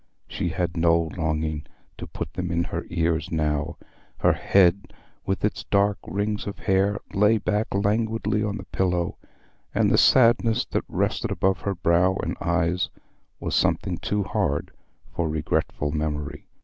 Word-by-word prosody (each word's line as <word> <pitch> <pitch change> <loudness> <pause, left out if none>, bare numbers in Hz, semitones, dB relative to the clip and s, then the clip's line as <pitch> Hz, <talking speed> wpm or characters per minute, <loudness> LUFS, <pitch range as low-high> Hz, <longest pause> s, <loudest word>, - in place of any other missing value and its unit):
She 85 - -2
had 85 +1 -2
no 85 -1 +3
longing 80 -2 -2 0.3
to - - -6
put 80 - -6
them 90 -1 -3
in 85 0 +1
her - - -5
ears 80 -2 0
now: 75 -2 -1 0.4
her - - +3
head 95 0 +3 0.3
with 95 +1 0
its 105 - -2
dark 100 0 +2
rings 105 +3 -2
of 100 - -5
hair 100 0 +1 0.2
lay 105 +3 +4
back 105 +1 0
languidly 105 +1 0
on 105 -1 -2
the 95 - -7
pillow, 90 -2 -1 0.6
and - - +3
the - - +4
sadness 115 -2 +4
that - - -1
rested - - -1
about 95 0 +1
her 100 -1 -2
brow 90 +2 +3
and - - -2
eyes 85 +1 +1 0.5
was - - -3
something - - +1
too 105 0 -1
hard 90 - -1 0.4
for 85 -2 -1
regretful 75 -1 -1
memory. 75 -2 -3
90 Hz, 150 wpm, -25 LUFS, 80-100 Hz, 0.6 s, lay